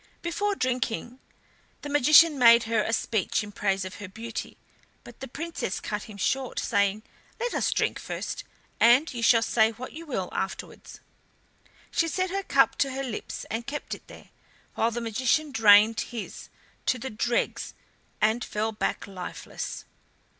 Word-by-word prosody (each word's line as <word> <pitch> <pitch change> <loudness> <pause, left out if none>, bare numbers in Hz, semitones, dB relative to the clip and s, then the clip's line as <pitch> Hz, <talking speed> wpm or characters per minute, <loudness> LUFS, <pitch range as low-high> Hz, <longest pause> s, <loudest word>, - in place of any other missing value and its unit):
Before 400 +4 -1
drinking 255 -3 -2 0.6
the - - -4
magician 290 +2 +6
made 235 -1 +8
her 225 -1 +1
a 220 - -2
speech 220 -2 0
in 205 - -8
praise 195 -2 -1
of 185 - -8
her 205 - -7
beauty, 225 +4 -7 0.5
but 240 - -14
the 265 - -6
Princess 315 - -4
cut 210 -1 -4
him 210 -2 -11
short, 260 +5 -1
saying: 200 +1 +1 0.4
"Let 485 +1 -2
us - - +1
drink - - 0
first, - - -5 0.4
and 250 +7 +5
you 235 - -4
shall 230 -1 +5
say 220 -2 +3
what 240 +3 -8
you 330 +2 -9
will 190 -10 -3
afterwards." 190 0 -6 0.9
She 330 - +1
set 370 +2 -1
her 395 +1 -1
cup - - +3
to 275 - +2
her 270 +1 -3
lips 245 -5 -5
and 230 +3 -3
kept 295 +1 -4
it - - -10
there, - - -14 0.4
while 225 - +1
the 235 +1 -4
magician 255 +7 0
drained 220 -1 +6
his 230 -3 -6 0.4
to 255 - +3
the 260 +1 -6
dregs 235 +2 -1 0.4
and 220 +3 +2
fell 215 +1 -2
back 215 - -2
lifeless. 185 -2 -7
235 Hz, 160 wpm, -27 LUFS, 215-275 Hz, 0.9 s, made